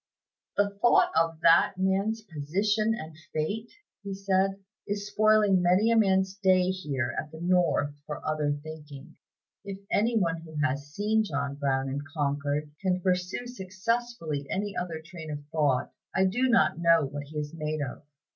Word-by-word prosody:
"The 205 0 +3
thought 240 - +5
of 165 0 +2
that 170 +3 +5
man's 195 +4 0
position 205 +7 0
and 160 -7 -8 0.2
fate," 205 +9 -2 0.3
he 200 -1 -5
said, 195 0 +1 0.3
"is 205 0 -2
spoiling 210 -2 +4
many 185 +6 +4
a - - +4
man's 190 -3 +3
day 185 -2 +3
here 140 -10 -2
at 150 - -6
the 160 - -10
North 175 -4 +2
for 150 - -4
other 150 -1 0
thinking. 155 -1 -10 0.5
If 200 -1 -6
any 225 +2 +2
one 165 -5 +1
who 160 -1 -12
has 140 0 -1
seen 215 +6 +1
John 140 -7 -2
Brown 135 -1 0
in 135 +2 -3 0.2
Concord, 145 +1 -1
can 185 -2 +1
pursue 180 +5 -1
successfully 190 - -3
any 200 +1 -2
other 170 -3 -4
train 160 -2 -9
of 145 -1 -6
thought, 145 -6 +1 0.2
I 190 - +4
do 245 +7 +1
not 160 -9 +3
know 165 -2 +4
what 145 +1 -6
he 155 +1 -8
is 150 +1 -4
made 155 -1 -3
of. 130 - -6
180 Hz, 165 wpm, -28 LUFS, 150-200 Hz, 0.5 s, thought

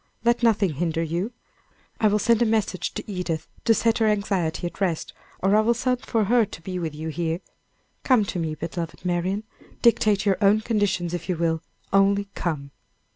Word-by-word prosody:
let 235 +1 +3
nothing 215 -7 +3
hinder 165 +2 -1
you. 170 +7 -2 0.7
I 215 - +4
will 210 0 +3
send 230 +2 +3
a - - +7
message 215 -4 -1
to - - -4
Edith 180 -5 -3 0.2
to 225 - +5
set 230 +1 +2
her 220 - +3
anxiety 195 -5 0
at 175 - -6
rest, 175 -5 -1 0.3
or 195 +2 +4
I - - +6
will 235 +2 +2
send 250 0 0
for 220 0 +1
her 235 +3 +4
to 185 - -7
be 185 0 -4
with 160 -3 -4
you 160 +1 -4
here. 165 +1 -2 0.6
Come 250 -6 +4
to 190 - -3
me, 160 -2 -2
beloved 165 +2 -5
Marian. 180 +4 0 0.4
Dictate 215 -4 +4
your 195 -2 +2
own 205 +2 +5
conditions 200 -6 0
if 175 +1 -5
you 180 - 0
will 165 -1 0 0.3
only 200 0 +3
come." 145 -5 -3
195 Hz, 190 wpm, -24 LUFS, 170-215 Hz, 0.7 s, a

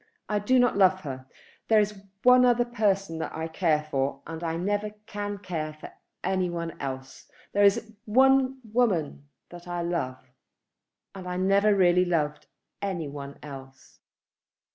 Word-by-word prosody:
I 210 -1 0
do 255 +6 +2
not 245 -4 +3
love 190 -1 +4
her. 130 -4 -7 0.4
There 220 -1 +5
is 210 -1 -1 0.2
one 250 0 +7
other 245 -1 +4
person 195 -8 0
that - - -4
I 160 +1 -3
care 160 -2 +1
for, 135 0 -1
and 165 +1 -7
I 165 0 -1
never 205 +4 -1 0.2
can 205 -1 -4
care 165 -5 -4
for 155 - -11 0.3
any 185 -1 0
one 170 -1 -4
else. 130 -1 -6 0.2
There 205 - +3
is 220 +2 +3
one 265 +3 +4
woman 205 -11 0 0.2
that 175 0 -11
I 175 -1 -3
love, 170 -7 -2 1.0
and 185 -2 -8
I 180 0 -3
never 200 +2 +3
really 180 -1 +4
loved 155 -4 -1 0.3
any 185 -6 -2
one 140 0 -8
else." 135 -2 -11
180 Hz, 155 wpm, -27 LUFS, 155-210 Hz, 1.0 s, one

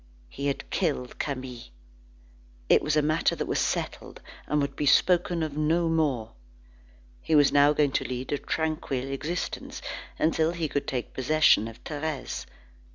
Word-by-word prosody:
He 140 +1 -4
had 140 - -2
killed 145 -9 -1
Camille. 130 -4 -4 1.0
It - - +6
was 150 0 0
a 150 - +3
matter 155 +2 +2
that - - -3
was - - -1
settled, - - -2 0.3
and 150 - +1
would 140 -1 -1
be 145 - -1
spoken 175 +2 +3
of 155 -2 -4
no 160 +3 +2
more. 145 -9 0 0.9
He 160 - +1
was 145 -2 +6
now 145 +1 +6
going 145 -2 +2
to - - 0
lead 125 0 -4
a 145 - 0
tranquil 145 -4 -2
existence, 160 +6 -4 0.4
until 160 +1 +2
he 170 -2 -2
could 145 0 -2
take 125 -2 -3
possession 135 -4 +4
of 115 0 -11
Thérèse. 150 -2 -4
150 Hz, 160 wpm, -27 LUFS, 135-160 Hz, 1.0 s, It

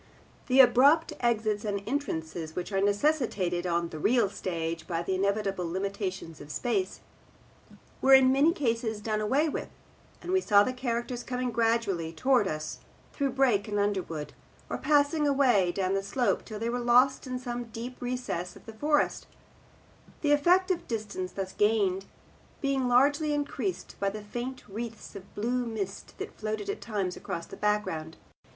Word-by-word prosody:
The 265 0 +7
abrupt 280 +6 +5
exits 220 -3 +1
and 200 -2 -2
entrances, 160 - -3
which 180 - -4
are 195 -1 +1
necessitated 205 - +1
on 170 -1 0
the 155 - -7
real 220 +2 +3
stage 165 -3 -4
by 170 -1 -2
the 190 - -1
inevitable 195 -2 0
limitations 190 -3 -4
of 145 - -11
space, 195 +1 -1 1.0
were 270 0 +8
in 260 -1 +6
many 280 +5 +4
cases 230 - -1
done 215 0 -1
away 270 +9 +2
with, 300 - -3 0.5
and 360 - -5
we 375 0 +3
saw 205 - +5
the 255 - -2
characters 240 -1 -3
coming 250 -1 -2
gradually 225 -8 +1
towards 240 +3 +2
us 155 0 -4 0.3
through 275 -3 -1
brake 245 -6 +2
and 205 -1 -2
underwood, 190 -7 -2 0.4
or - - -2
passing 295 +1 +3
away 250 -10 +3
down 185 +1 -1
the 195 - +1
slope 240 +5 0
till 215 - -7
they 225 +2 -2
were 245 - -1
lost 250 +3 +4
in 255 0 -3
some 245 -1 -4
deep 235 +2 -8
recess 245 -8 -3
of - - -15
the 225 - -9
forest; 295 +6 +1 0.9
the 295 - +2
effect 355 +6 +4
of 355 - -2
distance 210 -5 -4
thus 190 -1 -4
gained 200 -3 +2 0.5
being 275 -2 0
largely 285 +5 +3
increased 240 -10 -3
by 200 - +1
the 210 +1 -7
faint 245 +5 -5
wreaths 225 +1 -7
of 195 -1 -11
blue 245 +4 0
mist 205 -3 -5
that - - -6
floated 215 -2 -2
at - - -7
times 200 -5 -2
across 170 -4 -5
the - - -10
background. 210 -7 -1
220 Hz, 165 wpm, -29 LUFS, 195-255 Hz, 1.0 s, were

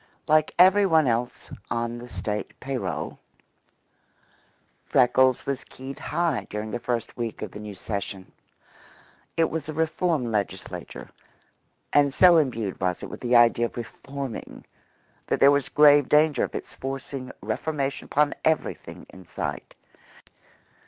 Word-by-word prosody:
Like 155 -1 +3
every 190 +3 +6
one 160 -4 +4
else 120 0 -2 0.2
on 120 0 -2
the 120 +1 -10
State 105 -2 -5
pay 135 +1 -4
roll, 125 - -4 1.6
Freckles 130 +1 +3
was 135 -1 -3
keyed 135 +1 -10
high 170 -6 -1
during 105 +1 -5
this 120 - -4
first 120 -1 -3
week 115 -3 -4
of 105 - -6
the - - -9
new 105 -1 -8
session. 100 -1 -5 1.1
It 165 -1 +2
was 155 -1 -4
a - - -3
reform 160 -4 0
Legislature, 100 -3 -4 0.8
and 145 -1 +4
so 175 +5 +6
imbued 115 - -1
was 90 -1 -1
it - - -7
with - - -8
the 125 0 +1
idea 120 0 +5
of - - -15
reforming 135 +2 -7 0.6
that - - 0
there 140 - +7
was 140 -2 +1
grave 145 -2 +6
danger 150 -3 +4
of - - -4
its - - -6
forcing 135 -1 -6
reformation 135 +6 -3
upon 150 0 +2
everything 160 0 -2
in 95 -2 -14
sight. - - -5
130 Hz, 140 wpm, -25 LUFS, 115-150 Hz, 1.6 s, there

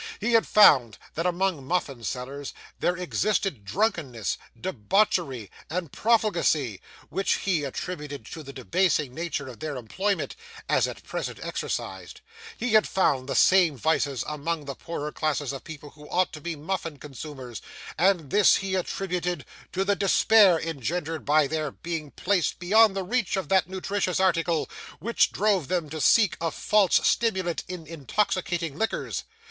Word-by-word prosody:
He 235 +3 0
had 225 - +4
found 130 - +6 0.2
that 165 +3 -1
among 180 -4 0
muffin 140 -5 -2
sellers 130 +4 -5 0.2
there 175 0 +1
existed 180 - -1
drunkenness, 135 - -1 0.2
debauchery, 160 - 0 0.2
and 170 -3 -3
profligacy, 170 - +1 0.3
which 195 - 0
he 175 -6 0
attributed 145 -3 -5
to 160 - -7
the 140 -2 -9
debasing 150 0 0
nature 160 -3 -3
of 120 -4 -10
their 155 -2 -4
employment 190 - -2 0.3
as - - +3
at - - -8
present - - -4
exercised; - - -5 0.4
he 245 -2 -2
had 215 -1 +5
found 140 -8 +1
the - - -1
same 180 -7 +5
vices 140 -2 0
among 150 +1 -3
the 140 - -4
poorer 150 0 -5
class 155 -1 0
of 140 -2 -5
people 150 -2 -10
who 150 -1 -15
ought 185 0 +1
to 155 - -8
be 170 +1 -4
muffin 165 0 -4
consumers; 135 - -8 0.3
and 175 -5 +2
this 205 -1 +6
he 195 -1 -2
attributed 180 -4 -2 0.3
to 190 +1 -1
the 200 0 +2
despair 195 -2 +5
engendered 160 +1 -3
by 150 +1 +4
their 155 +1 -2
being 160 +1 -5
placed 185 +3 0
beyond 210 +3 +4
the 195 - -1
reach 215 0 0
of 190 - -3
that 190 -3 +3
nutritious 190 0 -1
article, 170 -3 +1 0.3
which 230 +9 +2
drove 195 -7 +1
them 170 -4 -1
to 155 -1 -4
seek 210 -3 +4
a 165 - +1
false 205 +4 +3
stimulant 190 -7 +1
in 180 -3 -7
intoxicating 165 0 -1
liquors. 225 +7 -2
165 Hz, 155 wpm, -26 LUFS, 145-190 Hz, 0.4 s, found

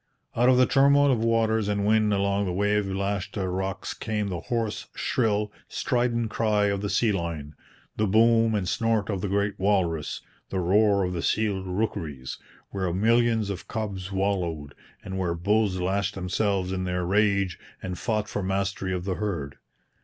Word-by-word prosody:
Out 120 +2 +4
of 130 - +5
the 130 - +6
turmoil 140 +1 +4
of 115 -3 +1
waters 110 -2 +2
and 100 -1 0
wind 110 0 +3
along 100 0 +1
the 90 - -2
wave 105 +2 +1
lashed 100 +2 -2
rocks 95 0 -2
came 105 -3 -2
the 90 -3 -3
hoarse, 115 +2 -3
shrill, 105 -3 0 0.2
strident 120 -2 0
cry 105 -2 +2
of 100 -1 -1
the 100 - -2
sea 115 +1 +2
lion, 85 -6 -4 0.4
the 110 - +1
boom 115 +2 +4
and 95 -3 -1
snort 110 0 0
of 95 -2 -2
the 100 - -1
great 100 +1 -1
walrus, 90 -6 0 0.3
the 95 - -3
roar 100 +2 +3
of 90 0 -2
the 85 - -2
seal 105 -1 0
rookeries, 85 -9 -3 0.3
where 95 -3 -1
millions 110 +2 +2
of 95 - -7
cubs 100 -4 -4
wallowed, 90 -7 -1 0.3
and 95 0 -5
where 85 -2 0
bulls 100 +2 +1
lashed 100 +2 -1
themselves 95 0 -1
in 95 -1 -2
their 90 0 -1
rage 100 -2 +1 0.2
and 90 -2 -4
fought 110 -3 -1
for 105 - -3
mastery 95 0 -1
of 90 0 -4
the 95 - 0
herd. 80 -10 -3
100 Hz, 170 wpm, -26 LUFS, 95-110 Hz, 0.4 s, the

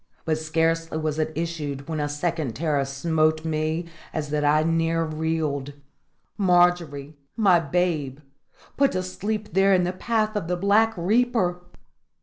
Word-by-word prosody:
But 155 -1 0
scarcely 165 +1 0
was 155 -1 -2
it 155 0 0
issued 150 -4 -4
when 160 -1 -3
a 145 0 -1
second 150 -4 -2
terror 145 -1 0
smote 155 +3 0
me 155 +1 -1 0.3
as 150 -2 -3
that 150 -1 0
I 150 +1 +3
near 165 0 +1
reeled. 155 -3 -2 0.7
Margery 175 -6 +2 0.2
my 195 -6 +5
babe! 160 -4 -1 0.6
put 275 0 +3
to 185 0 -1
sleep 210 +2 -4
there 195 +1 +4
in 180 - +2
the 180 +1 -1
path 215 +2 -1
of 205 -5 -2
the 180 0 -1
Black 215 +4 +3
Reaper! 195 -1 +1
165 Hz, 145 wpm, -24 LUFS, 155-180 Hz, 0.7 s, my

